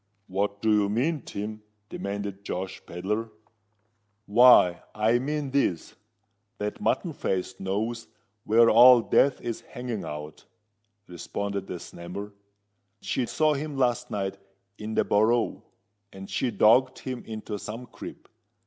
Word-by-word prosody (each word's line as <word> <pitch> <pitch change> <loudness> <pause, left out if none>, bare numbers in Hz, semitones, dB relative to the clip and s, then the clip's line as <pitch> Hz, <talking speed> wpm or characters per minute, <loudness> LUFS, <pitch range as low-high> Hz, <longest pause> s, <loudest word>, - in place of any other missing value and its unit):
"What 100 +2 -2
do 110 - +3
you 105 -1 +3
mean, 135 +8 0
Tim?" 105 +1 -6 0.3
demanded 100 -1 -5
Josh 95 -1 -5
Pedler. 105 +6 -3 1.0
"Why, 105 -5 +6
I 110 +3 +3
mean 145 +1 -3
this—that 105 - -4
Mutton 175 -4 0
Face 95 -8 -3
knows 110 +5 -3 0.4
where 115 +2 +5
Old 120 +1 +7
Death 140 -1 +4
is 115 -2 -4
hanging 120 -3 -6
out," 75 0 -7 0.6
responded 100 +3 -5
the - - -5
Snammer. 90 +5 -8 0.7
"She 125 +2 -2
saw 155 -1 +2
him 145 0 -4
last 125 -3 +1
night 100 -1 -3 0.4
in 110 +1 -5
the - - +3
Borough; 115 +3 +2 0.5
and 95 0 -9
she 130 - -1
dogged 120 +5 +4
him 130 -2 -6
into 110 -1 -5
some 115 +5 -7
crib. - - -11
110 Hz, 125 wpm, -27 LUFS, 100-125 Hz, 1.0 s, Old